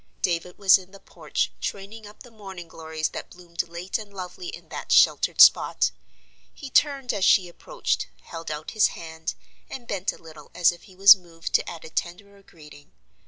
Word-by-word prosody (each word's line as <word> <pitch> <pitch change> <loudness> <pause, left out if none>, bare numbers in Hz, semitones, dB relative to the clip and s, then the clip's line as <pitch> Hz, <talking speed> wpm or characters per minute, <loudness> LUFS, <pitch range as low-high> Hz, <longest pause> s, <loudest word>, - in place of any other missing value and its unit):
David 175 0 -1
was 195 -1 +6
in 185 -1 -15
the 195 +1 -15
porch, - - -3
training 205 +2 -6
up 210 - -14
the 245 - -16
morning 190 -5 -10
glories 160 -1 -4
that - - -8
bloomed 175 -2 -5
late 175 +4 -4
and 210 -2 -10
lovely 180 -2 -8
in - - -9
that - - -7
sheltered - - +4
spot. - - +6 0.6
He 275 -2 -10
turned 275 -4 +2
as 200 -3 -2
she 185 -1 +5
approached, - - -3 0.2
held 165 -2 -8
out 150 0 -5
his 215 - +4
hand, 160 -1 -6 0.3
and 245 -3 -9
bent 195 -1 -2
a - - -14
little 155 -3 -14
as 175 -1 +4
if 175 - -14
he 185 - -17
was 195 +2 +9
moved 170 -3 -10
to - - +2
add 165 - -9
a - - -9
tenderer 200 +5 -5
greeting. 150 -5 -17
180 Hz, 190 wpm, -25 LUFS, 165-200 Hz, 0.6 s, was